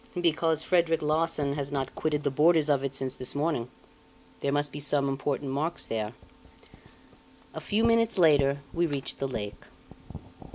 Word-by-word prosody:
"Because 160 -2 +1
Frederic 165 -3 +2
Larsan 150 -2 0
has 140 -1 -4
not 135 -2 -2
quitted 150 -1 -1
the 140 - 0
borders 155 +2 +4
of 140 -2 +2
it 135 -1 -2
since 130 -1 -2
this 130 0 -3
morning. 145 -5 -1 0.7
There 140 - -1
must 145 +1 0
be 145 - -6
some 145 -1 +1
important 135 0 -2
marks 155 +5 -2
there." 110 0 -3 1.4
A - - -6
few 215 +2 0
minutes 230 -1 +3
later 140 -5 +4
we 170 0 +1
reached 140 -3 -3
the 135 - -1
lake. 110 -5 -6
145 Hz, 160 wpm, -28 LUFS, 135-160 Hz, 1.4 s, borders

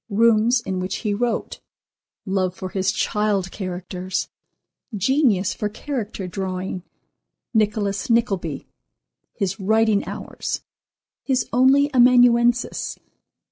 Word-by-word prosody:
—Rooms 230 +3 +4
in 190 -5 -3
which 185 +1 -3
he 210 - +1
wrote.—Love 195 -4 -4
for 185 - -6
his 190 0 0
child 205 -2 0
characters.—Genius 190 - -2
for 210 - -3
character 220 -5 -5
drawing.—Nicholas 195 +3 -4
Nickleby.—His 185 - -3
writing 220 +1 +2
hours.—His 260 -2 -5
only 275 +3 +4
amanuensis. 245 -1 +4
210 Hz, 75 wpm, -22 LUFS, 190-235 Hz, -, Rooms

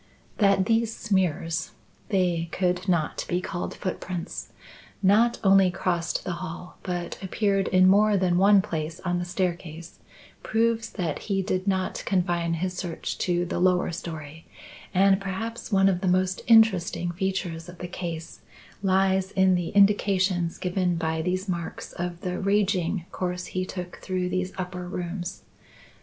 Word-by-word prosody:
"That 195 -2 +4
these 225 0 +1
smears 180 -5 0 0.4
(they 175 -4 +1
could 180 +1 0
not 165 -4 0
be 175 - +1
called 180 -1 -4
footprints) 180 -2 -5 0.5
not 220 +5 +4
only 195 -1 +6
crossed 175 -2 -1
the - - -3
hall 180 0 -7
but 175 -1 -4
appeared 195 0 0
in 185 0 +5
more 205 +2 +5
than 180 -2 +2
one 200 0 +6
place 160 -4 -4
on 180 -1 -1
the 175 - -3
staircase 175 -2 -4 0.4
proves 230 0 +1
that 170 -7 -2
he 195 -1 +1
did 185 0 -2
not 190 -1 0
confine 175 -3 0
his 180 +2 -2
search 175 -3 -4
to 175 -1 +1
the 175 - -3
lower 180 -1 +3
storey; 160 -2 -7 0.4
and 195 +1 +4
perhaps 225 +5 -5
one 195 -1 +5
of 185 -2 +1
the 190 - -1
most 185 +1 +1
interesting 185 -6 +4
features 175 -2 -3
of 175 - -11
the 180 - -6
case 170 -2 -6 0.4
lies 190 -1 +2
in 190 -1 +3
the 175 -2 0
indications 195 -3 +3
given 180 -1 0
by 160 -1 -1
these 185 +3 -1
marks 170 -3 -4
of 175 0 -4
the 180 -1 -3
raging 195 -3 +1
course 180 0 -3
he 185 0 -3
took 180 -2 -6
through 185 -1 -2
these 185 0 -1
upper 180 -1 -5
rooms. 175 0 -5
185 Hz, 150 wpm, -26 LUFS, 175-195 Hz, 0.5 s, only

